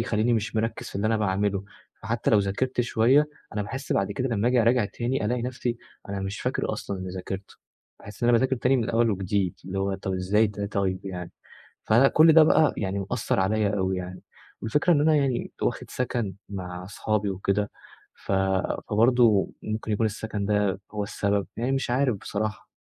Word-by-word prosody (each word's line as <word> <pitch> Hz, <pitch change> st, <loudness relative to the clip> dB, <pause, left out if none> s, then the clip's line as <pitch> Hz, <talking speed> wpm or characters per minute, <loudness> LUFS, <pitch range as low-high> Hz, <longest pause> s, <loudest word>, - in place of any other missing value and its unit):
يخليني 115 Hz, +1 st, +1 dB
مش 110 Hz, 0 st, -1 dB
مركِّز 115 Hz, +1 st, -2 dB
في -, -, -13 dB
اللي 100 Hz, +2 st, 0 dB
أنا 110 Hz, -, +2 dB
باعملُه، 100 Hz, -1 st, 0 dB, 0.4 s
فحتى 115 Hz, +2 st, -1 dB
لو 110 Hz, -, +6 dB
ذاكرت 100 Hz, +6 st, 0 dB
شوية 125 Hz, +5 st, +3 dB, 0.3 s
أنا 105 Hz, -, -1 dB
باحس 135 Hz, +7 st, -4 dB
بعد 100 Hz, +1 st, 0 dB
كده 130 Hz, +3 st, -2 dB
لمّا 115 Hz, 0 st, +1 dB
آجيّ 125 Hz, -2 st, +3 dB
أراجع 120 Hz, 0 st, +3 dB
تاني 120 Hz, +4 st, -2 dB
ألاقي 120 Hz, +2 st, 0 dB
نفسي 125 Hz, -1 st, -2 dB, 0.3 s
أنا 100 Hz, 0 st, -3 dB
مش 95 Hz, +2 st, -4 dB
فاكر -, -, -1 dB
أصلًا 100 Hz, -, -4 dB
اللي 95 Hz, -, -5 dB
ذاكرتُه، 95 Hz, +2 st, -6 dB, 0.4 s
باحس 105 Hz, +2 st, -12 dB
إن 120 Hz, -, +3 dB
أنا 120 Hz, -, +6 dB
باذاكر 130 Hz, +1 st, +1 dB
تاني 130 Hz, +3 st, +2 dB
من 115 Hz, -3 st, -1 dB
أول 115 Hz, 0 st, +3 dB
وجديد، 95 Hz, -2 st, -1 dB
اللي 95 Hz, +1 st, -4 dB
هو 95 Hz, 0 st, 0 dB
طيّب 95 Hz, 0 st, -3 dB
إزاي 100 Hz, +4 st, +2 dB
ده 105 Hz, 0 st, -4 dB
طيّب 95 Hz, -2 st, -2 dB
يعني، 90 Hz, -2 st, -6 dB, 0.6 s
فأنا 120 Hz, +5 st, +5 dB
كُلّ 160 Hz, +2 st, +6 dB
ده 160 Hz, 0 st, +8 dB
بقى 155 Hz, 0 st, +4 dB
يعني 100 Hz, -1 st, -2 dB
مأثّر -, -, 0 dB
عليَّ 105 Hz, +2 st, +1 dB
أوي 95 Hz, -1 st, 0 dB
يعني، 90 Hz, 0 st, -6 dB, 0.4 s
والفكرة 150 Hz, +10 st, +2 dB
إن 145 Hz, -, +3 dB
أنا 155 Hz, 0 st, +4 dB
يعني 135 Hz, -4 st, 0 dB
واخد -, -, -2 dB
سَكَن 120 Hz, -5 st, -2 dB, 0.2 s
مع 90 Hz, -2 st, -6 dB
أصحابي 105 Hz, +1 st, -1 dB
وكده، 100 Hz, +2 st, -1 dB, 0.4 s
ف -, -, -7 dB, 0.6 s
فبرضه 115 Hz, -1 st, +4 dB
ممكن 110 Hz, 0 st, -3 dB
يكون 110 Hz, +2 st, +1 dB
السَكَن 110 Hz, -1 st, -3 dB
ده 105 Hz, -2 st, +1 dB
هو 105 Hz, -1 st, -2 dB
السبب، 100 Hz, 0 st, -1 dB
يعني 120 Hz, +3 st, 0 dB
مش 135 Hz, -1 st, -1 dB
عارف 125 Hz, -1 st, +2 dB
بصراحة. 105 Hz, +1 st, -4 dB
105 Hz, 190 wpm, -26 LUFS, 100-120 Hz, 0.6 s, ده